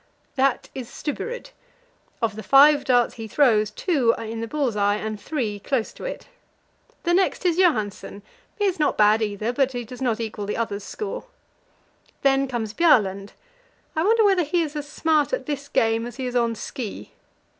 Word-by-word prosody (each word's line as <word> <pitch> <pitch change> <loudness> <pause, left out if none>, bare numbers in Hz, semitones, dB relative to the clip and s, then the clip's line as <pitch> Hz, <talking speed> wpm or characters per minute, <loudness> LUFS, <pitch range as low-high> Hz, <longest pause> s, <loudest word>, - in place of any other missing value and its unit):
That 270 -2 +1
is 255 -3 -7
Stubberud; 480 - -5 0.7
of 220 -2 0
the 220 - -6
five 285 +3 +6
darts 245 -2 +3
he 225 -1 -7
throws, 215 -4 +3
two 250 - +1
are - - -6
in 225 +1 -5
the 230 - -3
bull's 270 -3 -1
eye 205 0 +2
and 215 0 -5
three 220 -7 -3
close 235 +2 -2
to - - -9
it. - - -6 0.8
The 345 - +1
next 375 +1 +1
is 345 -2 +2
Johansen; 215 - 0 0.3
he 415 - +1
is 375 -4 0
not 300 - +1
bad, 215 +1 +5
either, 215 +2 -2
but 270 0 +1
does 250 +3 -10
not 235 -3 0
equal 220 -3 -4
the 210 - -2
other's 210 -3 -3
score. 435 - -5 1.0
Then 275 0 +3
comes 230 -4 -3
Bjaaland; 205 - +2 0.6
I 315 - +1
wonder 445 +3 +4
whether 390 -3 +4
he 335 +3 +1
is 305 -1 -6
as 290 -1 -5
smart 310 - +1
at - - -1
this 285 -2 -4
game 225 -2 +1
as 240 - -9
he 260 0 -4
is 250 0 -4
on 235 -1 +1
ski? 225 -1 -7
250 Hz, 185 wpm, -23 LUFS, 220-300 Hz, 1.0 s, five